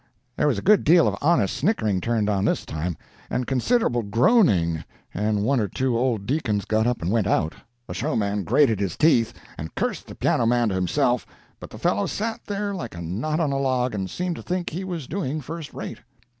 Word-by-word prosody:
"There - - +2
was - - +2
a - - -4
good 210 -2 +5
deal 170 +2 +6
of - - 0
honest 145 - +2
snickering 110 - +1
turned 110 0 0
on 100 -2 +1
this - - 0
time, 80 +1 -3 0.3
and 125 - -1
considerable 135 - +1
groaning, 105 - +3 0.3
and 105 +1 0
one 135 +4 +2
or 105 - 0
two 130 +5 -1
old 115 -4 0
deacons 110 -7 -1
got 110 +1 +1
up 120 -7 -1
and 85 - 0
went 110 -3 +2
out. 80 -4 +1 0.3
The - - -6
showman 105 -8 -1
grated 110 - +3
his 100 -2 -2
teeth, 120 -8 +4 0.3
and 80 0 -7
cursed - - -2
the - - -9
piano 115 - +1
man 120 -1 +3
to - - -2
himself; 120 +7 +1 0.3
but - - -9
the - - -10
fellow 100 +1 +1
sat 225 +2 -3
there 205 0 -2
like 145 - -6
a 85 - -6
knot 120 - -2
on 155 -4 +1
a 135 - 0
log, 130 -2 0
and 95 -2 -3
seemed 180 - -3
to - - -7
think 180 -1 -3
he 180 +5 -4
was 175 -6 -4
doing 155 -2 -3
first 155 +2 -7
rate. - - -7
120 Hz, 210 wpm, -24 LUFS, 100-155 Hz, 0.3 s, deal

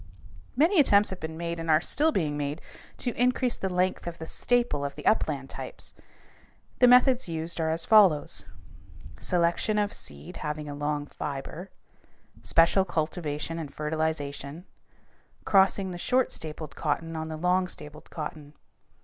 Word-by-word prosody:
Many 330 +7 +4
attempts 210 -8 +5
have 190 - -5
been 160 0 -6
made 170 0 -3
and 165 0 -4
are 155 -1 +6
still 300 - +1
being 155 - 0
made 145 +1 -3 0.4
to 245 - -2
increase 250 +1 +1
the 190 - -3
length 180 0 0
of 170 - -5
the 160 - -7
staple 240 -5 0
of 140 0 -4
the - - -10
upland 145 -10 +1
types. - - -6 0.9
The 250 - +7
methods 250 -3 +5
used 165 +1 -3
are 160 - +1
as 160 +1 0
follows: 195 -9 +5 0.8
selection 175 +4 +1
of 205 0 +1
seed 70 +1 -8
having 150 0 -4
a 145 - -5
long 145 0 -2
fiber; 145 +6 -6 0.7
special 170 +3 +4
cultivation 160 -2 -3
and 150 -4 -6
fertilization; 150 0 -3 0.8
crossing 195 -1 +3
the 175 - -6
short 255 +7 +1
stapled 155 -1 -6
cotton 165 +2 -2
on 160 0 -3
the 160 -1 -5
long 180 +2 +2
stapled 150 -3 -10
cotton. 150 -2 -7
165 Hz, 150 wpm, -27 LUFS, 150-195 Hz, 0.9 s, The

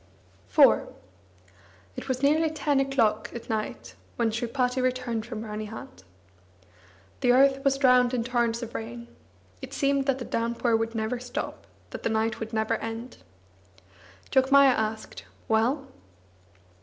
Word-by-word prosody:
IV 90 - +5 1.1
It - - -7
was 260 +1 -2
nearly 310 +3 +3
ten 295 -2 0
o'clock 230 -6 +1
at 235 -1 -6
night 215 -1 -4 0.2
when 230 -2 +1
Sripati 250 +3 -1
returned 250 -3 -1
from 225 -3 -5
Ranihat. 210 - -7 1.2
The 245 - +3
earth 270 +1 +4
was 275 -1 +2
drowned 250 -2 +4
in 245 -3 -1
torrents 235 -1 0
of 230 - -7
rain. 235 +1 -7 0.5
It - - -8
seemed 275 0 +1
that 270 -1 +2
the 250 - -6
downpour 235 0 0
would 225 +1 -1
never 225 +2 -2
stop, 245 0 -6 0.2
that - - -7
the - - -1
night 220 0 0
would 220 -1 -5
never 220 0 0
end. 225 +2 -6 1.1
Jogmaya 275 +1 +6
asked: 220 -1 -4 0.2
"Well?" 240 +6 +1
240 Hz, 135 wpm, -27 LUFS, 225-265 Hz, 1.2 s, Jogmaya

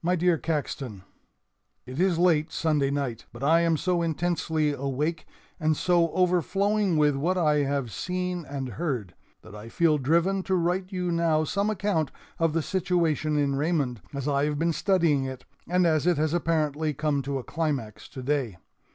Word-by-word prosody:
] - - -45
"My 180 +2 +2
Dear 175 -2 +2
Caxton: 135 - -3 0.8
"It 130 +4 -7
is 185 -2 +2
late 165 -3 +3
Sunday 150 -4 +1
night, 140 -5 -3
but 120 +3 -9
I 160 +4 +5
am 165 -1 +2
so 180 +1 0
intensely 160 -2 0
awake 145 +4 -2 0.3
and 155 -2 +1
so 175 -2 +3
overflowing 190 +1 +1
with 150 -2 +3
what 170 +7 0
I 155 -4 +3
have 140 -4 -1
seen 180 -1 -3
and 135 -2 -5
heard 115 - -3 0.3
that - - -13
I 105 +2 -9
feel 155 +3 +2
driven 170 +8 +2
to 190 0 -1
write 180 +2 0
you 180 -2 -2
now 165 -2 +2
some 200 +7 0
account 200 -7 0 0.3
of 165 -2 +2
the 165 -1 0
situation 165 -5 0
in 140 -1 +1
Raymond 140 -6 0
as 140 -1 -4
I 140 0 +2
have 150 -1 -1
been 165 +2 +1
studying 165 -5 +2
it, 130 -1 -7 0.2
and 180 0 +3
as 155 -1 +2
it 175 -3 +3
has 155 +1 0
apparently 155 -3 0
come 150 -1 0
to 140 0 -3
a 130 - -5
climax 135 -11 -3
today. 130 -6 -2
155 Hz, 175 wpm, -26 LUFS, 140-175 Hz, 0.8 s, I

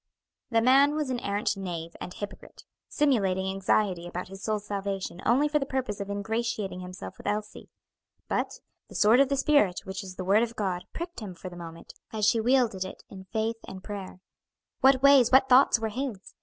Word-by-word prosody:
'" - - -63
The 230 -1 +2
man 275 +4 +5
was 300 -4 -1
an 245 - -1
arrant 205 -1 -1
knave 170 -4 -6
and - - -6
hypocrite, 205 +2 -9 0.3
simulating 195 -10 +1
anxiety 190 -2 0
about 180 +1 -6
his 195 0 -10
soul's 210 -1 -2
salvation 195 -3 -4
only 265 +6 +4
for 300 0 +1
the 275 - -2
purpose 260 -7 -2
of 200 0 -5
ingratiating 205 -1 -2
himself 180 +1 -9
with - - -8
Elsie; 210 0 -4 0.6
but - - -2 0.3
"the - - -14
sword 220 +4 +5
of 275 -1 +4
the 280 - 0
spirit, 265 -10 +3
which 190 0 -5
is 185 -1 -9
the 185 - -5
word 200 +4 +4
of 235 0 -2
God," 185 -5 -2
pricked 340 +1 -6
him 200 -5 -7
for 185 - -8
the 175 - -11
moment, 165 -1 -10 0.2
as 215 -2 +1
she 225 +1 +3
wielded 235 -5 +2
it 190 - -9
in 190 -1 -10
faith 220 +4 -2
and 190 0 -9
prayer. 195 -3 -7 0.6
What 265 0 +4
ways, 275 -4 +7
what 265 0 +6
thoughts 255 0 +6
were 225 -1 -2
his! 235 -4 -5
210 Hz, 200 wpm, -27 LUFS, 190-255 Hz, 0.6 s, ways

